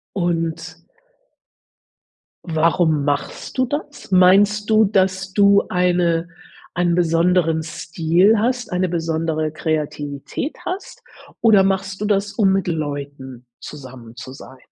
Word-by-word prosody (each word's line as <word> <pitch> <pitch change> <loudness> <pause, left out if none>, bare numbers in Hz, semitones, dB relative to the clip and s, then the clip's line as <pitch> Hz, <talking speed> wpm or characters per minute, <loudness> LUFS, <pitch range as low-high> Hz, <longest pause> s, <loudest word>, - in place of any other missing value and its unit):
Und 165 -2 -2 1.7
warum 160 -2 +1
machst 145 - -3
du 255 - +2
das? 290 -2 -6
Meinst 200 +3 +4
du, 220 0 +5
dass 190 -1 0
du 200 0 +4
eine 175 -2 +1 0.5
einen 175 -1 +1
besonderen 165 -1 +2
Stil 165 +5 +1
hast, 245 +2 -1
eine 180 0 0
besondere 160 -2 -2
Kreativität 150 - -4
hast 370 +2 -6 0.4
oder 215 -4 +5
machst 190 0 -2
du - - -2
das, 205 -1 0
um 195 -4 +2
mit 195 -1 0
Leuten 140 -5 -5
zusammen 130 -5 -11
zu 130 +2 -9
sein? 130 -1 -13
175 Hz, 115 wpm, -20 LUFS, 155-195 Hz, 1.7 s, du